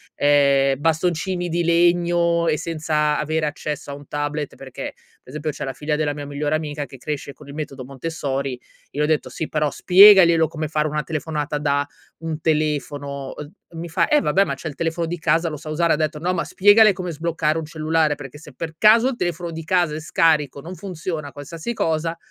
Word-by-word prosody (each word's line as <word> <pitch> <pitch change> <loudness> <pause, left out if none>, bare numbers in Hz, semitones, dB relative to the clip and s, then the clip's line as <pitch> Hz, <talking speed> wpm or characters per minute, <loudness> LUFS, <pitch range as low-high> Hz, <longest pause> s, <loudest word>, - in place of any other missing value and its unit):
ehm, 140 -2 +3
bastoncini 175 +3 0
di 170 +1 0
legno 170 0 +2
e 155 -1 +2
senza 155 -2 0
avere 155 +1 -1
accesso 150 -1 -4
a - - -5
un 145 -1 -13
tablet, 145 0 -3
perché, 135 -2 -7 0.3
pe' - - -19
esempio, 150 +3 -3
c'è 145 - -6
la 135 - -4
figlia 150 +3 -2
della 150 -1 0
mia 145 -1 -6
migliore 145 +1 -2
amica, 150 -2 -3
che 135 0 -13
cresce 140 +2 -5
con 145 +1 -16
il - - -8
metodo 140 -3 -6
Montessori, 135 -2 -4 0.3
io 150 - -1
ho - - +3
detto: 155 -1 0
"Sì, 160 - -5
però 150 -1 0
spiegaglielo 180 -3 +7
come 155 -1 -4
fare 155 0 0
una 150 0 -2
telefonata 150 0 -3
da 145 -1 +1 0.3
un 160 -1 -4
telefono", 145 -3 -2
uhm, 150 0 -8 0.3
mi 170 +1 -6
fa: 165 - +1
"Eh, 300 - +4
vabbè, 195 -6 +3
ma 140 -6 -3
c'è 150 - -7
il 145 - -10
telefono 165 0 -1
di 175 +1 -4
casa, 165 +2 +1
lo 150 - -6
sa 155 +1 -9
usare" 165 +2 +2
ha - - +3
detto: 155 0 -2
"No, 180 +3 0
ma - - -1
spiegale 205 +2 +6
come 180 -1 -5
sbloccare 160 -1 -1
un 160 - -3
cellulare, 155 -1 0
perché 140 0 -10
se 150 -2 -13
per 160 +4 -6
caso 220 +6 +6
il 265 - -4
telefono 175 -4 -3
di 165 0 -6
casa 175 -3 +1
è - - -4
scarico, 155 -3 +2
non 175 +5 -8
funziona, 165 -6 -5
qualsiasi 160 - -6
cosa, 165 -4 -1
155 Hz, 205 wpm, -22 LUFS, 145-170 Hz, 0.3 s, spiegaglielo